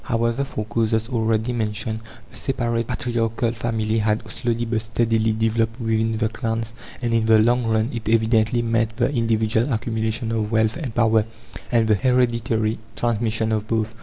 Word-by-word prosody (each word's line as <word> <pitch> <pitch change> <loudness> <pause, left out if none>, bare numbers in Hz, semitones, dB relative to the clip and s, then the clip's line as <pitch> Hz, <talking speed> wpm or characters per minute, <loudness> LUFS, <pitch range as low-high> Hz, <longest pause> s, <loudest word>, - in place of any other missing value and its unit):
However, 115 +2 0
for 110 -6 -4
causes 110 +1 0
already 115 -1 0
mentioned, 110 -1 -2 0.3
the - - -15
separate 115 -4 -1
patriarchal 115 -2 -1
family 115 -1 -1
had 110 +1 0
slowly 120 +1 -1
but 115 -1 -1
steadily 115 0 +1
developed 115 +1 0
within 110 -1 0
the 110 - +1
clans, 115 0 -3 0.3
and 120 -1 0
in 115 -1 +2
the 110 0 +6
long 120 +2 +3
run 110 +2 +1
it 115 -2 -4
evidently 115 +1 +2
meant 115 -1 0
the 125 +3 +1
individual 115 +1 +1
accumulation 110 0 -1
of 110 -1 -1
wealth 110 -1 +2
and 135 -9 -5
power, 110 -2 +3 0.5
and 115 -2 +3
the 110 - +4
hereditary 115 -1 +1 0.2
transmission 110 -1 0
of 110 -1 -1
both. 110 -1 -1
115 Hz, 165 wpm, -22 LUFS, 110-115 Hz, 0.5 s, the